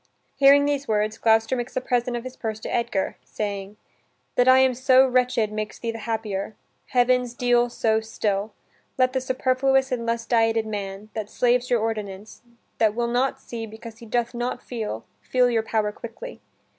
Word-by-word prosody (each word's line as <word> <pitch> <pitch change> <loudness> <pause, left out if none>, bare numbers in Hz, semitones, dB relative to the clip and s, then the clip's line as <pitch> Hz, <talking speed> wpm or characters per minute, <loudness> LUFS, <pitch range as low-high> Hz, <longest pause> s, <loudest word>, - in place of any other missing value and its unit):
Hearing 280 +1 +6
these 285 -1 -1
words, 215 0 0
Gloucester 225 +2 +3
makes 245 0 -5
a - - +2
present 245 -1 -1
of 235 - -6
his 255 0 -8
purse 220 -2 -4
to - - -5
Edgar, 235 -5 -1
saying: 200 -1 -5 0.6
"That 245 - +3
I 260 0 +8
am 260 -1 +4
so 260 +1 +5
wretched 250 -4 +1
Makes 215 0 -4
thee 230 - -3
the 225 - -7
happier; 215 -2 -3 0.3
heavens, 250 -1 +2
deal 245 -1 +2
so 220 -2 +1
still, 215 -1 -2 0.5
Let 255 0 +3
the 260 - 0
superfluous 260 +1 +1
and 235 -2 -2
lust 230 0 -1
dieted 225 -1 +2
man, 205 -1 -5
That 215 -2 -4
slaves 245 0 +1
your 240 -3 +2
ordinance, 210 -2 -5 0.4
that 220 -2 +3
will 235 0 0
not 250 +3 0
see 225 -2 -7
Because 225 +1 -11
he 230 - -11
doth 235 +1 -1
not 245 +1 -3
feel, 215 - -5 0.2
feel 250 -1 +2
your 230 -1 +2
power 215 -1 -1
quickly. 355 - -9
235 Hz, 180 wpm, -24 LUFS, 220-250 Hz, 0.6 s, I